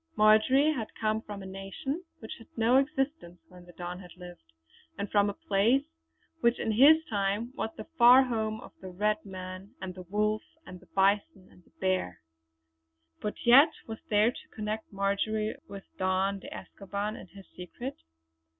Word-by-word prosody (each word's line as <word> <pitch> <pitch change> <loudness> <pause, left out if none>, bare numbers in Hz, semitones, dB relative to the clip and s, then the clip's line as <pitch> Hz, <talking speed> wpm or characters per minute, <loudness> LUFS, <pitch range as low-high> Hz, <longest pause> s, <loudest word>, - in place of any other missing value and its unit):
Marjory 220 +8 +5
had 230 -7 -4
come 215 0 0
from 205 -3 -8
a - - -9
nation 195 - -5
which 220 - -10
had 230 - -15
no 230 +3 +4
existence 270 - -1
when 180 -1 -15
the 175 - -14
Don 180 +1 -6
had 180 -2 -12
lived, 175 - -12 0.5
and 200 - -3
from 205 -1 +3
a 200 - -5
place 220 +9 +2 0.6
which 235 -4 +3
in 225 - -1
his 300 +8 +6
time 205 +4 -1
was 225 - -3
the - - -6 0.2
far 245 +3 +9
home 220 -3 -2
of - - -12
the 190 - -7
red 210 +4 0
man 185 0 -9
and 185 -1 -6
the 185 - -9
wolf 210 +4 0 0.2
and 180 0 -10
the - - -21
bison 195 - +1
and 180 - -20
the - - -27
bear. 185 - -1 1.0
But 210 - -5
yet 270 +7 +8 0.2
what 225 -1 -7
was - - -39
there 215 +2 +4
to - - -13
connect 215 0 -4
Marjory 205 +2 -1
with 200 -1 -9 0.2
Don 190 +1 +1
de - - -10
Escoban 200 +2 -5
and 185 - -11
his 195 -1 -14
secret? 240 +9 -7
210 Hz, 175 wpm, -29 LUFS, 190-230 Hz, 1.0 s, far